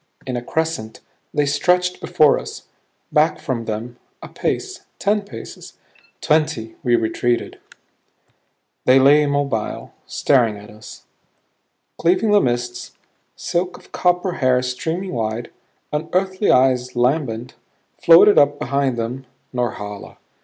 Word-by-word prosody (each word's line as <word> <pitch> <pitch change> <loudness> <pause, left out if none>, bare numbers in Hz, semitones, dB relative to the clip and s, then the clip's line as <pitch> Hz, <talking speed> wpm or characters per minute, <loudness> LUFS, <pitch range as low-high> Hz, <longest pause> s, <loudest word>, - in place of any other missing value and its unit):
In 130 -2 -3
a 120 - -2
crescent, 160 -5 -3 0.3
they 145 - +1
stretched 180 +5 +1
before 155 -5 +3
us. - - -9 0.5
Back - - +3
from 115 -3 -3
them, 115 +3 -5 0.3
a - - -8
pace, - - -3
ten 205 +1 +1
paces, 120 - -11 0.4
twenty, 150 -8 0
we 120 -1 +2
retreated. 120 +1 -1 1.3
They 130 +1 +6
lay 140 +3 +6
immobile 140 -6 -2
staring 120 -6 +2
at 105 0 -13
us. 105 +1 -13 1.0
Cleaving 185 +6 +2
the 205 - +5
mists, 120 0 -3 0.4
silk 180 +1 -2
of - - -20
copper 180 +1 +1
hair 130 -1 +2
streaming 160 +9 -3
wide, 115 0 -3 0.4
unearthly 185 +6 0
eyes 125 -1 +3
lambent, 125 -2 0 0.5
floated 170 +5 +7
up 145 0 +3
behind 140 -3 -1
them 125 +3 -4 0.3
Norhala. 105 -5 -4
130 Hz, 115 wpm, -20 LUFS, 120-160 Hz, 1.3 s, floated